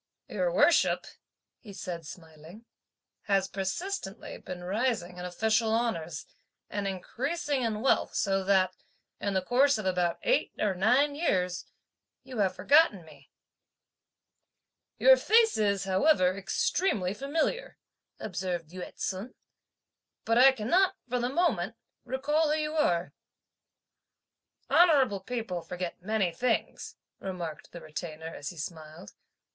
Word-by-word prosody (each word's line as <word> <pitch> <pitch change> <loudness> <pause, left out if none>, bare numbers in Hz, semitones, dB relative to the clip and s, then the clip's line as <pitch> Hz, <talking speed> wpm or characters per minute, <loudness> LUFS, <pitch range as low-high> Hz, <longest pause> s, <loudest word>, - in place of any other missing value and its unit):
"Your - - -1
worship," - - +3 0.5
he 205 -4 -12
said 170 -4 -6
smiling, 165 +6 -12 0.6
"has 195 -2 +2
persistently 195 - -4
been 180 -1 -8
rising 190 -3 -1
in 180 - -5
official 220 +5 +1
honours, 170 -10 -2 0.5
and 205 -1 -2
increasing 275 - -2
in 220 -3 -1
wealth 270 - +2
so 195 -1 +1
that, 185 -2 +3 0.4
in 200 -1 -2
the 190 - +1
course 265 +6 +3
of 215 - -5
about 180 -2 +1
eight - - +1
or 205 -2 +1
nine 250 +10 +3
years, 180 - -1 0.6
you 255 -3 -7
have 195 -2 +1
forgotten 285 - +4
me." 145 -3 -17 1.7
"Your - - +7
face 450 0 +4
is, 200 -2 +1
however, 190 -1 +3
extremely 195 - 0
familiar," 315 - -2 0.4
observed 180 -4 -4
Yü 185 0 -8 0.2
ts'un, 200 +6 -4 0.9
"but 230 - +2
I 260 +3 +8
cannot, 350 - +2
for 250 0 -1
the 245 +1 -1
moment, 240 - 0 0.3
recall 295 +5 0
who 305 - +2
you 305 0 -2
are." 180 - +1 1.5
"Honourable 280 - +4
people 205 -4 -4
forget 180 0 -6
many 200 -2 0
things," 235 +6 -2 0.2
remarked 175 -5 -6
the 170 - -9
Retainer, 160 0 -7
as 145 - -6
he 175 - -11
smiled. 160 +3 -8
200 Hz, 125 wpm, -29 LUFS, 180-265 Hz, 1.7 s, I